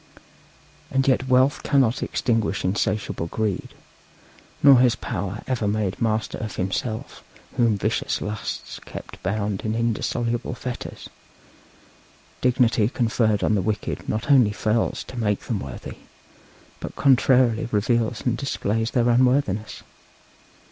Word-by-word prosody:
And 135 0 +1
yet 130 0 +2
wealth 130 +2 +3
cannot 135 -3 +2
extinguish 110 -5 0
insatiable 100 -2 -1
greed, 105 +1 -3 0.9
nor 140 -3 +8
has 125 -2 +4
power 100 0 -4
ever 120 -5 -1
made 100 -2 0
him - - -5
master 110 0 -1
of 110 -2 -5
himself 110 +4 -3 0.3
whom 115 -4 +3
vicious - - -1
lusts 105 0 -5
kept - - -10
bound 100 0 -2
in 110 0 -1
indissoluble 115 +1 -1
fetters; 125 0 -6 1.3
dignity 120 -3 +3
conferred 110 -4 +1
on - - +2
the 100 - +2
wicked 105 +3 -3
not 110 +6 -1
only 125 -7 +6
fails 110 +1 0
to 125 - -8
make 105 -3 0
them 110 -5 -3
worthy, 70 -6 -8 0.8
but - - -7
contrarily 125 -4 +3
reveals 115 +2 0
and 120 -2 +1
displays 115 -5 -1
their 120 -1 +1
unworthiness. 120 -4 +1
115 Hz, 125 wpm, -24 LUFS, 105-125 Hz, 1.3 s, nor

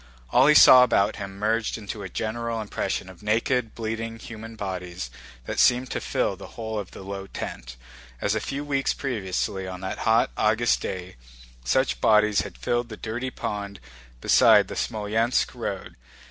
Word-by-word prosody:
All 130 +3 +5
he 150 - +6
saw 130 -3 +10
about 105 -5 +2
him 100 -1 -7
merged 110 +2 0
into 105 -1 -7
a 95 - -6
general 115 +3 -3
impression 105 -3 -3
of 95 -2 -13
naked, 115 +2 0
bleeding 115 0 -4
human 115 0 -9
bodies 90 - -5 0.3
that - - -3
seemed 125 +1 +4
to - - -2
fill - - -1
the - - -10
whole 110 -1 -3
of 100 - -6
the - - -11
low 95 0 -6
tent, - - -7 0.4
as 100 - 0
a 110 - 0
few 140 +5 -4
weeks 140 -2 0
previously, 100 -5 -2
on 90 0 -7
that 95 - -4
hot 115 +1 +3
August 110 +2 +2
day, 90 -5 -5 0.5
such - - +1
bodies 105 -1 +4
had - - -8
filled 120 - -1
the 110 - -8
dirty 120 +4 -4
pond 100 -5 -5 0.4
beside - - +5
the - - -5
Smolénsk 110 +2 0
road. - - -5
110 Hz, 170 wpm, -25 LUFS, 95-115 Hz, 0.5 s, saw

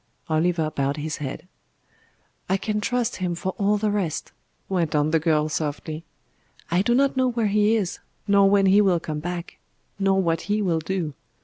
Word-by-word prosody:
Oliver 160 0 +1
bowed 140 +1 -1
his 150 +1 -3
head. 150 +4 -6 1.0
"I 190 - +3
can 210 +2 -2
trust 245 0 -1
Him 180 -2 -2
for 190 +2 -3
all 205 +1 +3
the 210 0 0
rest," 190 -7 -2 0.4
went 170 -5 0
on 150 +1 +2
the 160 - +3
girl 155 -1 +2
softly. 155 +1 -3 0.7
"I 175 +2 +3
do 240 +4 +2
not 275 +1 +3
know 260 -1 +2
where 235 -2 0
He 210 +2 +3
is, 200 -5 -2 0.3
nor 200 -1 +5
when 200 0 +4
He 195 +2 +6
will 185 -4 +3
come 155 -2 -4
back, 175 +1 -6 0.4
nor 195 -1 +3
what 165 -3 +1
He 210 +1 +2
will 175 -6 +1
do. 165 -2 -3
180 Hz, 185 wpm, -24 LUFS, 160-205 Hz, 1.0 s, He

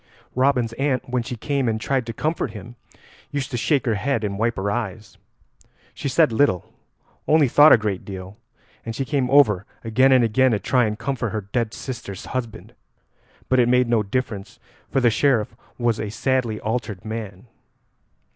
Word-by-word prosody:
Robin's 130 -3 +1
aunt 135 -2 0
when 125 0 -1
she 125 +2 -5
came 135 +1 -1
and 110 0 -1
tried 130 +1 -1
to - - -2
comfort 150 +8 -2
him 110 +3 -10 0.5
used 140 -2 -3
to - - -3
shake 135 +2 +1
her 115 - +1
head 115 +2 -1
and 100 -1 -3
wipe 115 +1 +1
her 100 +1 -2
eyes. 105 -3 -4 0.8
She 140 - -4
said 155 0 +3
little, 110 -7 +1 0.5
only 155 -2 +5
thought 145 +5 +7
a - - +9
great 105 -4 -3
deal, 95 0 -8 0.5
and 115 -1 -5
she 135 - -2
came 135 -2 0
over 125 -9 +5 0.2
again 130 +4 +3
and 130 -2 +5
again 125 +3 +3
to 105 - +1
try 125 +1 +2
and 105 0 -2
comfort 120 0 -2
her 110 +1 -3
dead 110 +3 -3
sister's 105 -7 -7
husband; 115 -4 -5 0.7
but 130 - +2
it 120 -1 +4
made 125 0 +3
no 115 -2 +2
difference, 105 -1 -4 0.3
for 135 - +1
the 120 -2 +4
Sheriff 120 -4 +1 0.2
was 120 -2 0
a 105 - -3
sadly 120 0 -1
altered 110 -4 -4
man. 110 -2 -6
120 Hz, 180 wpm, -22 LUFS, 105-130 Hz, 0.8 s, a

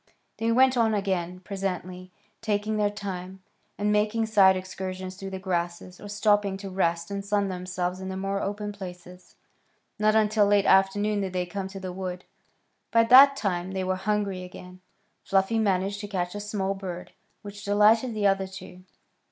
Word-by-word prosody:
They 225 +1 0
went 260 +2 +4
on 225 -2 +3
again 185 -3 -2
presently, 185 -2 -5 0.3
taking 215 -1 -1
their 210 -1 +2
time, 190 -2 -7 0.3
and 210 0 0
making 210 +2 +1
side 195 -4 +5
excursions 185 0 -6
through 195 +1 -7
the 190 - -5
grasses, 180 -1 -4
or 205 - -9
stopping 205 -1 +1
to 195 -1 -8
rest 170 -1 -1
and 200 0 -3
sun 200 -1 0
themselves 180 0 -3
in 190 0 -6
the 190 - -4
more 195 +1 -2
open 205 +1 -3
places. 180 -2 -11 0.6
Not 215 0 +3
until 215 -1 +3
late 200 -1 +3
afternoon 205 +2 +3
did 190 -2 -4
they 180 -1 -1
come 190 +2 -5
to 195 0 -8
the 185 -1 -6
wood. 180 -1 -5 0.6
By 230 0 +4
that 265 +4 +8
time 190 -6 -2
they 190 -1 -2
were 185 0 0
hungry 200 -1 -2
again. 180 0 -11 0.4
Fluffy 195 +3 +1
managed 200 -1 0
to 205 - -6
catch 180 -3 -3
a 205 - -5
small 205 -2 -2
bird, 185 -2 -7 0.3
which 205 0 -9
delighted 215 +4 +3
the 210 -1 -1
other 195 -1 +2
two. 185 -1 -11
195 Hz, 175 wpm, -26 LUFS, 185-210 Hz, 0.6 s, that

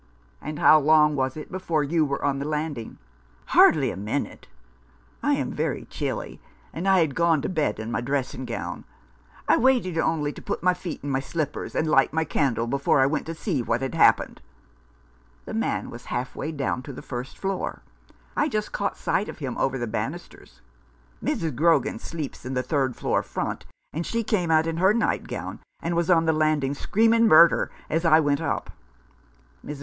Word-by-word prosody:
"And 150 0 -5
how 155 - +7
long 150 0 +4
was 130 +1 -1
it 155 - -8
before 170 -5 -1
you 160 +3 +1
were 140 -1 -2
on 140 -1 0
the 140 - -3
landing? 150 -6 -4 0.2
" - - -33
" - - -32
Hardly - - +6
a - - -6
minute. 105 +9 -4 0.7
I - - +2
am - - -1
very - - -2
chilly, - - -4 0.3
and 175 +4 -3
I 190 -2 +5
had 155 -4 +1
gone 165 0 +3
to - - -1
bed 155 - -1
in 110 +1 -5
my 120 - -1
dressing 130 0 -2
gown. - - -5 0.6
I - - +5
waited 235 -10 +2
only 150 -3 0
to - - -11
put - - -4
my 180 0 +4
feet 180 -2 -7
in 145 - -3
my 135 - +1
slippers 150 +1 -4
and - - +1
light 135 -2 +3
my 160 0 +1
candle, 135 -6 0
before 140 +3 +1
I 135 - +5
went 150 +3 -1
to 165 - -4
see 160 - -1
what 120 +2 -1
had 135 - -3
happened. - - +3 1.0
The - - -7
man - - -2
was - - -10
halfway 130 +5 -4
down 140 -4 -2
to 140 +1 -9
the - - -9
first 125 0 -6
floor. 195 -1 -3 0.5
I 295 - +1
just 215 -4 -2
caught 200 - -2
sight 205 - -1
of - - -8
him 135 -5 -4
over 135 0 0
the 120 - -2
banisters. 105 - -6 0.6
Mrs. 160 -5 -1
Grogan 165 +5 +2
sleeps 155 -5 -6
in 130 +1 -4
the 125 - 0
third 130 -2 0
floor - - 0
front, - - -4 0.3
and 165 - -2
she 230 +6 -2
came 200 -6 0
out 160 0 +4
in 165 0 -2
her 190 +4 +4
nightgown, 235 - -2 0.2
and 170 +1 -2
was 170 0 0
on 165 -2 +4
the 160 - +3
land 155 -2 +2
ing 135 +1 0
screaming 225 +8 +3
murder 165 -2 +6 0.2
as 165 +2 -1
I 160 -2 +6
went 145 -2 +1
up. - - -2 0.9
Mrs. 150 -1 -7
155 Hz, 195 wpm, -25 LUFS, 135-170 Hz, 1.0 s, how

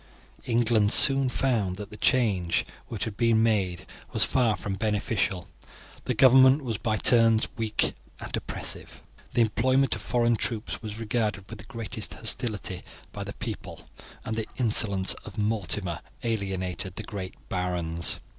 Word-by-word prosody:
England 115 -3 +2
soon 135 -1 +7
found 110 -9 0
that 105 0 -8
the - - -8
change 100 -9 +1 0.2
which - - -4
had 110 - -4
been 115 -1 +3
made 95 -6 0 0.3
was - - +3
far 120 -5 +2
from 100 - -4
beneficial. 105 -3 -1 0.6
The 125 - -1
government 130 +3 +6
was 115 -5 -3
by 110 -2 0
turns 115 -1 +4
weak 110 -2 0 0.3
and - - -4
oppressive. - - -4 0.4
The 120 - +4
employment 130 +5 +2
of - - -7
foreign 120 -1 +1
troops 110 0 -3
was 110 -2 -6
regarded 105 -3 -2
with 115 - -10
the 105 - -9
greatest 115 -3 -6
hostility 110 -5 -1 0.3
by - - -6
the - - -7
people, - - -7 0.4
and 110 - -3
the 110 -1 -4
insolence 105 -5 +3
of - - -11
Mortimer 105 -5 -2 0.2
alienated 95 -5 -3
the 110 - -5
great 95 -3 -6
barons. 85 -2 0
110 Hz, 145 wpm, -27 LUFS, 100-120 Hz, 0.6 s, soon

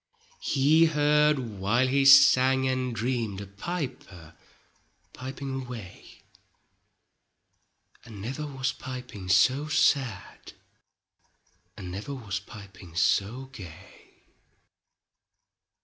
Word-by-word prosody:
He 150 +4 +3
heard 150 -1 +3
while 115 +1 0
he 135 +1 +1
sang 130 -1 +6
and 130 -2 -2
dreamed 115 -3 -2
A 100 - -7
piper 100 - -7 0.8
piping 135 +1 -6
away, 120 -7 -11 1.8
And 110 -4 -11
never 135 +8 -5
was 135 -2 -2
piping 125 -8 -8
so 130 +10 +3
sad. 140 -8 0 1.2
And 90 -2 -7
never 105 +9 -6
was 100 -7 -4
piping 100 -4 -13
so 105 +8 +1
gay. 90 -5 -14
125 Hz, 85 wpm, -27 LUFS, 100-135 Hz, 1.8 s, sang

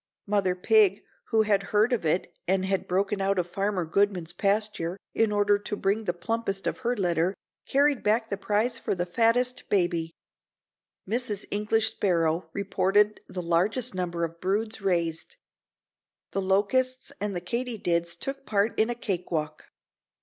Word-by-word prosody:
Mother 200 -3 +1
Pig 415 - +4 0.2
who 220 -1 +3
had 205 -2 +2
heard 215 +4 +3
of 235 - 0
it 160 +4 0
and 190 +1 +2
had 190 0 -1
broken 195 +2 0
out 195 0 +1
of 180 - +1
Farmer 195 0 -1
Goodman's 180 -1 0
pasture 200 -2 0 0.2
in 225 -1 +2
order 205 0 +3
to 210 +1 -4
bring 205 +3 0
the 175 - 0
plumpest 195 +1 -2
of - - -2
her 245 -1 0
litter, 175 0 +1 0.3
carried 280 -1 +3
back 220 +2 +1
the - - +1
prize 220 +4 0
for - - -1
the 175 -1 -1
fattest 235 +6 +1
baby. 175 -4 +1 1.0
Mrs. 215 -2 -2
English 220 +2 +1
Sparrow 165 -3 0
reported 200 +2 +1
the 180 -1 -5
largest 190 +9 +1
number 175 -2 -2
of 165 0 -4
broods 215 +4 -1
raised. 170 - -1 1.0
The 195 - -1
locusts 230 +7 +1
and 205 -2 -2
the - - -1
katydids 180 -5 -1
took 275 +9 -5
part 210 -2 +1
in 220 +2 +3
a 240 - -1
cake 190 -6 -3
walk. 155 -2 -3
200 Hz, 155 wpm, -27 LUFS, 180-220 Hz, 1.0 s, Pig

